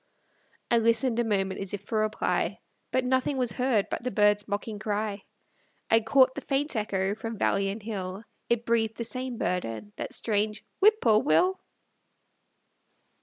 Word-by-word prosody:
I 235 - +5
listened 230 +1 +2
a - - +3
moment, 195 -4 -1
as 195 0 -4
if 200 - -10
for 215 +1 -1
reply, 215 0 0 0.3
But 260 -1 +1
nothing 260 +2 +1
was 250 -3 +2
heard 250 -4 +1
but - - -2
the 250 - -2
bird's 205 -1 +3
mocking 205 +1 -4
cry. 210 -1 -3 0.7
I 225 - +7
caught 260 +3 +4
the - - -6
faint 280 +1 -1
echo 195 -2 0
from 225 +1 -6
valley 195 0 +1
and 205 +2 -6
hill; 195 -2 -5 0.3
It 235 0 +1
breathed 225 -1 +1
the 235 - -2
same 255 +1 -4
burden, 180 - -3
that - - -4
strange 210 -1 -1
"Whip 435 +3 +5
poor 220 -4 +5
Will." 365 +6 +3
220 Hz, 165 wpm, -27 LUFS, 205-250 Hz, 0.7 s, I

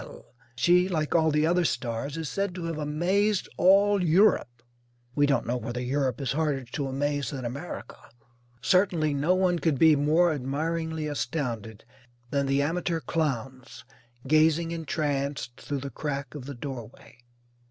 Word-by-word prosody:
She, 180 +9 +3
like 155 -4 -1
all 160 -1 +4
the 150 0 +2
other 175 +2 +2
stars, 140 0 -2
is 160 -2 -3
said 195 +3 -2
to 180 - -5
have 165 -2 -3
"amazed 180 +7 +1
all 200 +1 +4
Europe." 160 - +3 0.5
We 145 +2 +3
don't 135 -4 +1
know 125 +1 -1
whether 120 +1 -5
Europe 130 -1 -1
is 135 - -1
harder 150 -3 0
to 135 +3 -4
amaze 140 -1 -1
than 130 -3 -5
America. 140 +8 -6 0.7
Certainly 175 -5 +2
no 150 +6 +2
one 180 -2 +2
could 160 -5 +1
be 160 +2 +6
more 155 +4 +3
admiringly 160 +3 -2
astounded 120 -8 -4 0.5
than 140 -1 0
the 140 +1 +2
amateur 165 +2 -1
clowns 135 -6 -3 0.4
gazing 160 +2 +3
entranced 145 -5 -3
through 140 -2 -4
the 140 0 -6
crack 140 -1 -4
of 145 -4 -8
the 140 0 -7
doorway. 120 -2 -9
150 Hz, 150 wpm, -27 LUFS, 135-165 Hz, 0.7 s, be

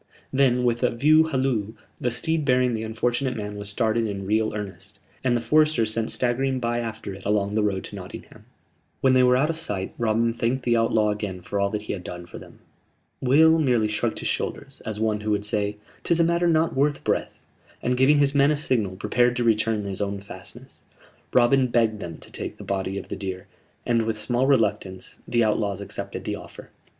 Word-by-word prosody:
Then, 130 -2 +3
with 120 -1 +1
a - - +3
"view 155 +6 +4
halloo," 130 -8 -1 0.2
the 125 - -1
steed 160 +6 0
bearing 125 -2 +2
the 110 - -2
unfortunate 120 +3 -1
man 105 -1 -5
was 100 0 -6
started 115 +1 0
in 100 -2 -4
real 110 +2 +1
earnest; 100 -1 -7 0.3
and 120 -2 +2
the - - -3
foresters 150 -3 +3
sent 115 0 -1
staggering 130 +2 0
by 120 -1 -1
after 110 -4 -5
it 95 0 -11
along 100 0 0
the 110 - +2
road 100 -2 0
to - - -9
Nottingham. - - -10 0.6
When 130 -1 +4
they 130 - +5
were 125 0 +5
out 150 +5 +2
of 160 - -6
sight, 100 -12 -4
Robin 115 0 +1
thanked 120 +3 -1
the 120 -1 +2
outlaw 115 -2 +2
again 105 -3 -4
for 100 +3 -3
all 100 0 +2
that 105 0 -3
he - - -3
had 95 -3 -6
done 90 0 -7
for - - -10
them. - - -14 0.6
Will 160 +5 +5
merely 125 -7 +2
shrugged 105 +2 -1
his - - -3
shoulders, 135 -1 -4
as 105 -1 -3
one 110 -1 0
who 105 - -3
would 105 -1 0
say: 105 0 -1 0.3
"'Tis 170 -1 +2
a - - +6
matter 170 +1 +2
not 165 0 +2
worth 145 +2 +1
breath"; - - -1 0.5
and, 125 - +1
giving 135 +4 +5
his 140 -1 +3
men 140 0 +4
a 150 - +1
signal, 115 -10 0
prepared 120 +5 +1
to 120 - 0
return 110 -1 +2
to 100 - -4
his 95 +1 -4
own 100 0 -2
fastnesses. 100 - -12 0.5
Robin 125 +2 +4
begged 115 -3 +1
them 85 -4 -6
to - - -15
take - - -6
the - - -9
body 95 0 -2
of - - -7
the - - -3
deer, 95 -2 -5 0.4
and, 115 -1 +2
with 110 -1 -2
small 120 +4 0
reluctance, 105 -7 0
the 120 -1 +2
outlaws 105 -2 0
accepted 100 - -6
the - - -3
offer. - - -12
115 Hz, 215 wpm, -24 LUFS, 105-130 Hz, 0.6 s, a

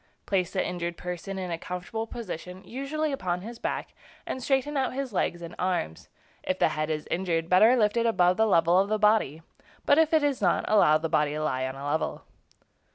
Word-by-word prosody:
Place 185 -3 0
the - - -1
injured 170 -1 -4
person 180 +2 -5
in 185 -2 -4
a 165 - -3
comfortable 180 +6 -5
position, 185 -4 -7
usually 285 +6 -3
upon 180 -9 -2
his 230 +4 -9
back, - - -4 0.3
and 260 - -4
straighten 270 +3 0
out 260 -2 0
his 270 -4 -4
legs 175 -2 -1
and 170 +1 -8
arms. 175 - -2 0.3
If 185 - -2
the - - +3
head 155 0 -2
is 155 -1 -2
injured, 170 -2 -1
better 215 +7 +6
lift 210 -3 +2
it 235 0 +2
above 180 -5 +3
the 220 0 +3
level 170 -2 +4
of 200 +1 +1
the 215 - +1
body; 210 -8 +2 0.4
but 285 - +5
if 320 -1 +3
it 315 -2 +3
is 285 -5 0
not, 180 -3 +2
allow 195 -8 +5
the 160 +1 -3
body 150 -2 +1
to 155 - -3
lie 130 -3 -1
on 130 - -6
a 135 +1 -7
level. 155 +2 -2
185 Hz, 215 wpm, -27 LUFS, 165-230 Hz, 0.4 s, better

